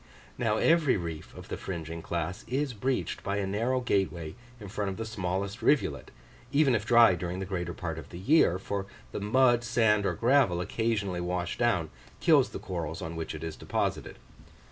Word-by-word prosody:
Now, 110 Hz, -3 st, 0 dB
every 160 Hz, -5 st, +4 dB
reef 85 Hz, -3 st, -6 dB
of -, -, -10 dB
the -, -, -3 dB
fringing 85 Hz, -2 st, -5 dB
class 85 Hz, +5 st, -3 dB
is 135 Hz, +1 st, -1 dB
breached 125 Hz, +5 st, -2 dB
by 100 Hz, 0 st, -1 dB
a 100 Hz, -, 0 dB
narrow 115 Hz, +6 st, 0 dB
gateway 90 Hz, -8 st, -1 dB, 0.3 s
in 105 Hz, -, -8 dB
front 100 Hz, 0 st, -2 dB
of 95 Hz, -, -5 dB
the 115 Hz, -, -3 dB
smallest 100 Hz, +1 st, -3 dB
rivulet, 110 Hz, -, +1 dB, 0.4 s
even 140 Hz, -2 st, +4 dB
if 110 Hz, -1 st, 0 dB
dry 115 Hz, -4 st, +7 dB
during 90 Hz, +1 st, -3 dB
the 95 Hz, -, -3 dB
greater 90 Hz, -3 st, -3 dB
part 80 Hz, -2 st, -4 dB
of -, -, -11 dB
the 85 Hz, -, -9 dB
year, 95 Hz, -, +4 dB
for 100 Hz, +1 st, -4 dB, 0.2 s
the -, -, -4 dB
mud, 120 Hz, +3 st, +4 dB
sand, 110 Hz, -4 st, +3 dB
or -, -, -1 dB
gravel, 120 Hz, -8 st, +3 dB
occasionally 100 Hz, -2 st, -1 dB
washed 90 Hz, 0 st, -2 dB
down 105 Hz, -10 st, +1 dB, 0.3 s
kills -, -, +5 dB
the -, -, -6 dB
corals 85 Hz, -3 st, -5 dB
on 80 Hz, +1 st, -5 dB
which 80 Hz, -1 st, -4 dB
it 80 Hz, -, -7 dB
is 80 Hz, -1 st, -4 dB
deposited. -, -, -2 dB
100 Hz, 190 wpm, -29 LUFS, 85-120 Hz, 0.4 s, dry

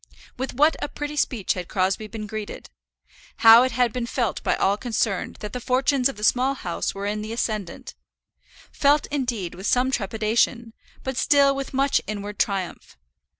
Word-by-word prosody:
With 260 Hz, 0 st, -5 dB
what 300 Hz, +4 st, +4 dB
a -, -, -1 dB
pretty 295 Hz, 0 st, -5 dB
speech 245 Hz, -8 st, 0 dB
had 180 Hz, -2 st, -6 dB
Crosbie 190 Hz, +3 st, -1 dB
been 215 Hz, -1 st, -7 dB
greeted! 215 Hz, 0 st, -7 dB, 0.7 s
How 225 Hz, +1 st, +10 dB
it 255 Hz, -1 st, +1 dB
had 245 Hz, -1 st, +1 dB
been 245 Hz, -2 st, -3 dB
felt 235 Hz, -5 st, -1 dB
by -, -, +1 dB
all 195 Hz, +1 st, +2 dB
concerned 220 Hz, -4 st, -2 dB
that 210 Hz, -1 st, -6 dB
the 250 Hz, -, -4 dB
fortunes 260 Hz, +1 st, +2 dB
of 270 Hz, -, -8 dB
the 210 Hz, -, -8 dB
Small 255 Hz, +4 st, +2 dB
House 175 Hz, -7 st, -3 dB
were 200 Hz, +1 st, -4 dB
in 210 Hz, +1 st, -2 dB
the 215 Hz, +1 st, -6 dB
ascendant, 215 Hz, -6 st, -4 dB, 0.8 s
felt, 290 Hz, +1 st, +3 dB
indeed, 240 Hz, -, -2 dB
with 190 Hz, +3 st, -6 dB
some 255 Hz, +1 st, +2 dB
trepidation, 225 Hz, +1 st, 0 dB, 0.3 s
but 265 Hz, -1 st, -4 dB
still 280 Hz, -1 st, +4 dB
with 275 Hz, 0 st, -5 dB
much 275 Hz, +1 st, +2 dB
inward 205 Hz, 0 st, -5 dB
triumph. 195 Hz, -3 st, -2 dB
230 Hz, 175 wpm, -24 LUFS, 205-265 Hz, 0.8 s, How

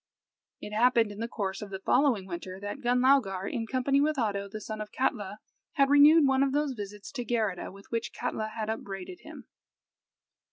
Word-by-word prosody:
It 210 Hz, -, -7 dB
happened 230 Hz, -1 st, +3 dB
in 205 Hz, -, -9 dB
the 230 Hz, -, -2 dB
course 195 Hz, -4 st, -4 dB
of 210 Hz, -, -7 dB
the 195 Hz, -, -5 dB
following 240 Hz, 0 st, +2 dB
winter 185 Hz, +1 st, -7 dB
that 205 Hz, +7 st, -6 dB
Gunlaugar, 245 Hz, -6 st, +2 dB
in 230 Hz, -2 st, -3 dB
company 265 Hz, +3 st, +1 dB
with 305 Hz, 0 st, +1 dB
Oddo, 200 Hz, -5 st, -1 dB
the 215 Hz, +2 st, -6 dB
son 215 Hz, +1 st, -6 dB
of 210 Hz, -, -7 dB
Katla, 210 Hz, -6 st, -1 dB, 0.4 s
had 275 Hz, -1 st, +3 dB
renewed 295 Hz, +2 st, +7 dB
one 270 Hz, 0 st, +3 dB
of 275 Hz, -1 st, +2 dB
those 295 Hz, -1 st, 0 dB
visits 205 Hz, -2 st, -8 dB
to 250 Hz, -4 st, -4 dB
Geirrida 220 Hz, -7 st, -1 dB
with 195 Hz, +1 st, -16 dB
which 230 Hz, -1 st, -2 dB
Katla 215 Hz, -, -3 dB
had 220 Hz, 0 st, -5 dB
upbraided 215 Hz, -, -5 dB
him. -, -, -12 dB
225 Hz, 190 wpm, -29 LUFS, 200-265 Hz, 0.4 s, renewed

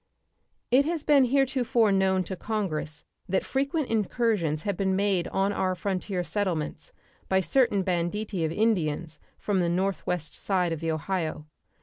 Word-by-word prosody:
It 260 Hz, +3 st, +6 dB
has 325 Hz, -1 st, -2 dB
been 285 Hz, -4 st, +5 dB
heretofore 250 Hz, -4 st, +2 dB
known 190 Hz, -1 st, +2 dB
to 190 Hz, +2 st, -5 dB
Congress 180 Hz, -8 st, -3 dB, 0.2 s
that 190 Hz, -, +1 dB
frequent 275 Hz, +2 st, -1 dB
incursions 210 Hz, -8 st, 0 dB
have 200 Hz, -2 st, -1 dB
been 190 Hz, 0 st, 0 dB
made 195 Hz, -3 st, +1 dB
on 195 Hz, +1 st, 0 dB
our 185 Hz, -2 st, 0 dB
frontier 185 Hz, -1 st, -2 dB
settlements 175 Hz, -3 st, -3 dB, 0.4 s
by 190 Hz, -, +4 dB
certain 230 Hz, -2 st, +2 dB
banditti 180 Hz, +1 st, -1 dB
of 160 Hz, -, 0 dB
Indians 165 Hz, -6 st, 0 dB, 0.2 s
from 200 Hz, -2 st, 0 dB
the 175 Hz, -1 st, +1 dB
northwest 180 Hz, -2 st, -1 dB
side 180 Hz, -3 st, 0 dB
of 165 Hz, -, -2 dB
the 165 Hz, 0 st, -2 dB
Ohio. 160 Hz, -1 st, -2 dB
190 Hz, 145 wpm, -27 LUFS, 170-220 Hz, 0.4 s, It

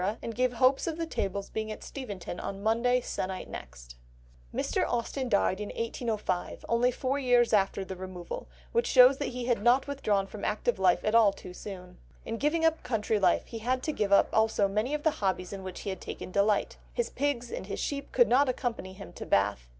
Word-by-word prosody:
and 230 Hz, -, -4 dB
gave 250 Hz, +1 st, +1 dB
hopes 255 Hz, +5 st, +3 dB
of 325 Hz, -1 st, -2 dB
the 335 Hz, -, -2 dB
tables 200 Hz, -, -3 dB
being 220 Hz, 0 st, -3 dB
at 215 Hz, -, -7 dB
Steventon 205 Hz, -9 st, -6 dB
on 200 Hz, 0 st, -5 dB
Monday 240 Hz, +3 st, +2 dB
se'nnight 185 Hz, -5 st, -4 dB
next." -, -, -10 dB, 0.5 s
Mr. -, -, 0 dB
Austen 245 Hz, +2 st, -2 dB
died 200 Hz, -2 st, +2 dB
in 210 Hz, -, -4 dB
1805, 225 Hz, -5 st, -3 dB
only 235 Hz, +2 st, +3 dB
four 260 Hz, +2 st, -1 dB
years 245 Hz, -3 st, +3 dB
after 195 Hz, -1 st, +2 dB
the 190 Hz, -, -6 dB
removal, 180 Hz, -2 st, -7 dB, 0.2 s
which 470 Hz, +1 st, +1 dB
shows 255 Hz, +1 st, +7 dB
that 285 Hz, -, -1 dB
he 250 Hz, -1 st, -4 dB
had 240 Hz, -4 st, +1 dB
not 245 Hz, +4 st, +4 dB
withdrawn 215 Hz, -9 st, 0 dB
from 200 Hz, +1 st, -9 dB
active 210 Hz, 0 st, 0 dB
life 185 Hz, -2 st, +3 dB
at 215 Hz, -, +1 dB
all 225 Hz, -3 st, +6 dB
too 180 Hz, -2 st, -11 dB
soon. 180 Hz, -2 st, -9 dB, 0.3 s
In 225 Hz, -, -3 dB
giving 310 Hz, +5 st, +1 dB
up 325 Hz, 0 st, +2 dB
country 220 Hz, -3 st, 0 dB
life 185 Hz, -3 st, +3 dB
he 230 Hz, -, -7 dB
had 255 Hz, +3 st, -1 dB
to 310 Hz, -, 0 dB
give 210 Hz, -8 st, -1 dB
up 200 Hz, -, +6 dB
also 220 Hz, -2 st, +3 dB
many 215 Hz, +8 st, 0 dB
of 295 Hz, -, -5 dB
the 315 Hz, -, +4 dB
hobbies 185 Hz, -1 st, -1 dB
in 195 Hz, -, -6 dB
which 185 Hz, -1 st, -7 dB
he 200 Hz, -, -3 dB
had 190 Hz, -, -7 dB
taken -, -, -7 dB
delight; 200 Hz, +2 st, +1 dB
his 480 Hz, -, -2 dB
pigs 255 Hz, -3 st, -1 dB
and 190 Hz, -, -5 dB
his 200 Hz, -, -4 dB
sheep 280 Hz, -1 st, -3 dB
could 240 Hz, -2 st, +5 dB
not 265 Hz, +3 st, +4 dB
accompany 235 Hz, -7 st, -3 dB
him 195 Hz, +1 st, -11 dB
to -, -, -7 dB
Bath. 100 Hz, -12 st, +1 dB
220 Hz, 210 wpm, -29 LUFS, 195-255 Hz, 0.5 s, shows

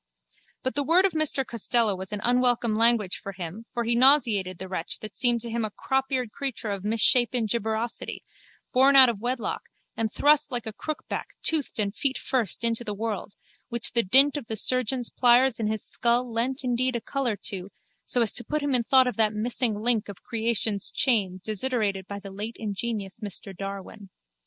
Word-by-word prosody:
But 260 Hz, -, -2 dB
the 290 Hz, -, 0 dB
word 345 Hz, +6 st, +4 dB
of 390 Hz, -, +2 dB
Mr 310 Hz, -4 st, 0 dB
Costello 230 Hz, -2 st, +1 dB
was 190 Hz, +1 st, -7 dB
an 210 Hz, -1 st, -4 dB
unwelcome 245 Hz, -2 st, +2 dB
language 225 Hz, -4 st, +2 dB
for 195 Hz, -, -7 dB
him 185 Hz, +5 st, -8 dB
for 240 Hz, -, -2 dB
he 235 Hz, +1 st, +1 dB
nauseated 235 Hz, -8 st, +4 dB
the 190 Hz, -, -7 dB
wretch 185 Hz, -3 st, -3 dB
that 215 Hz, -, -8 dB
seemed 240 Hz, -2 st, +2 dB
to 235 Hz, -, -4 dB
him 230 Hz, 0 st, -1 dB
a 215 Hz, -, -2 dB
cropeared 265 Hz, +1 st, -2 dB
creature 245 Hz, -6 st, -4 dB
of 200 Hz, -1 st, -4 dB
a -, -, -3 dB
misshapen 240 Hz, +2 st, +3 dB
gibbosity, 220 Hz, +1 st, -3 dB, 0.5 s
born 270 Hz, +2 st, +5 dB
out 260 Hz, -2 st, +9 dB
of 225 Hz, -4 st, -3 dB
wedlock 245 Hz, +2 st, -3 dB, 0.3 s
and 225 Hz, -1 st, -1 dB
thrust 290 Hz, -1 st, +3 dB
like 245 Hz, -2 st, -3 dB
a 220 Hz, -, -6 dB
crookback 310 Hz, +7 st, -5 dB, 0.2 s
toothed 315 Hz, -4 st, +1 dB
and 200 Hz, -1 st, 0 dB
feet 275 Hz, -1 st, 0 dB
first 235 Hz, -4 st, -2 dB
into 230 Hz, 0 st, 0 dB
the 210 Hz, -3 st, -4 dB
world, 210 Hz, -2 st, -4 dB, 0.3 s
which 235 Hz, -2 st, 0 dB
the 235 Hz, -, +3 dB
dint 270 Hz, +8 st, +4 dB
of 265 Hz, -6 st, -7 dB
the 220 Hz, -, -3 dB
surgeon's 255 Hz, +2 st, +1 dB
pliers 245 Hz, 0 st, +4 dB
in 220 Hz, -, -1 dB
his 215 Hz, 0 st, -3 dB
skull 240 Hz, 0 st, +1 dB
lent 255 Hz, +4 st, -1 dB
indeed 250 Hz, 0 st, 0 dB
a 235 Hz, -, -2 dB
colour 255 Hz, -2 st, -2 dB
to, 195 Hz, -2 st, -5 dB, 0.4 s
so 245 Hz, -, +2 dB
as 215 Hz, -, +1 dB
to 240 Hz, -, 0 dB
put 300 Hz, +2 st, -2 dB
him 285 Hz, -1 st, 0 dB
in 245 Hz, -2 st, +2 dB
thought 260 Hz, +2 st, +5 dB
of 250 Hz, -, -3 dB
that 220 Hz, -1 st, +2 dB
missing 225 Hz, 0 st, -1 dB
link 225 Hz, -3 st, +1 dB
of 200 Hz, -, -10 dB
creation's 220 Hz, -3 st, -1 dB
chain 200 Hz, -8 st, 0 dB
desiderated 215 Hz, -3 st, -1 dB
by 200 Hz, -, -6 dB
the 200 Hz, -1 st, -9 dB
late 210 Hz, +4 st, -6 dB
ingenious 210 Hz, -1 st, -4 dB
Mr 200 Hz, -2 st, -6 dB
Darwin. 195 Hz, +1 st, -8 dB
230 Hz, 195 wpm, -26 LUFS, 210-255 Hz, 0.5 s, out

